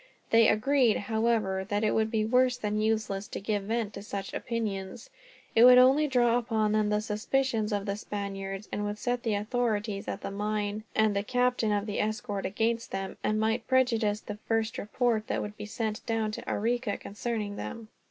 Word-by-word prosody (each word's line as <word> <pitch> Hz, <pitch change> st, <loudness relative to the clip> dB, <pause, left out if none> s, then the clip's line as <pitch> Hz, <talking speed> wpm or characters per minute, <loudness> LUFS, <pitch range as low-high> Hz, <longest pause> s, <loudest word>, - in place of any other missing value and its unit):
They 230 Hz, -1 st, +6 dB
agreed, 245 Hz, +1 st, +3 dB
however, 220 Hz, -3 st, 0 dB
that 205 Hz, +1 st, 0 dB
it 215 Hz, -, +3 dB
would 220 Hz, 0 st, +1 dB
be 220 Hz, -1 st, 0 dB
worse 250 Hz, +2 st, +3 dB
than 210 Hz, -2 st, -1 dB
useless 215 Hz, -2 st, -1 dB
to -, -, -5 dB
give 205 Hz, 0 st, -2 dB
vent 220 Hz, -1 st, -1 dB
to -, -, -7 dB
such 200 Hz, -1 st, -5 dB
opinions. 215 Hz, -, -4 dB, 0.4 s
It 230 Hz, -, +6 dB
would 250 Hz, 0 st, +9 dB
only 270 Hz, +4 st, +6 dB
draw 240 Hz, -3 st, +3 dB
upon 220 Hz, -3 st, 0 dB
them 215 Hz, -1 st, +2 dB
the 210 Hz, 0 st, +1 dB
suspicion 220 Hz, +1 st, 0 dB
of 200 Hz, -1 st, -1 dB
the 200 Hz, -, -1 dB
Spaniards, 195 Hz, -1 st, -5 dB
and 205 Hz, -, -2 dB
would 205 Hz, 0 st, -3 dB
set 245 Hz, +2 st, -1 dB
the 225 Hz, -3 st, 0 dB
authorities 210 Hz, -2 st, -1 dB
at -, -, -4 dB
the -, -, -5 dB
mine 210 Hz, +1 st, -2 dB
and 220 Hz, -2 st, +3 dB
the 200 Hz, -, +1 dB
captain 245 Hz, 0 st, +1 dB
of 205 Hz, 0 st, 0 dB
the 210 Hz, -1 st, -3 dB
escort 215 Hz, -2 st, -2 dB
against 230 Hz, +3 st, -1 dB
them, 195 Hz, 0 st, -4 dB
and 215 Hz, 0 st, +1 dB
might 225 Hz, +2 st, 0 dB
prejudice 230 Hz, -5 st, +2 dB
the 210 Hz, 0 st, -7 dB
first 225 Hz, 0 st, 0 dB
report 220 Hz, 0 st, 0 dB
that -, -, -1 dB
would 210 Hz, 0 st, -5 dB
be 210 Hz, -, -7 dB
sent 215 Hz, 0 st, -3 dB
down 225 Hz, -2 st, 0 dB
to -, -, -6 dB
Arica, 235 Hz, 0 st, 0 dB
concerning 210 Hz, 0 st, -4 dB
them. 230 Hz, +1 st, -6 dB
215 Hz, 190 wpm, -29 LUFS, 205-235 Hz, 0.4 s, would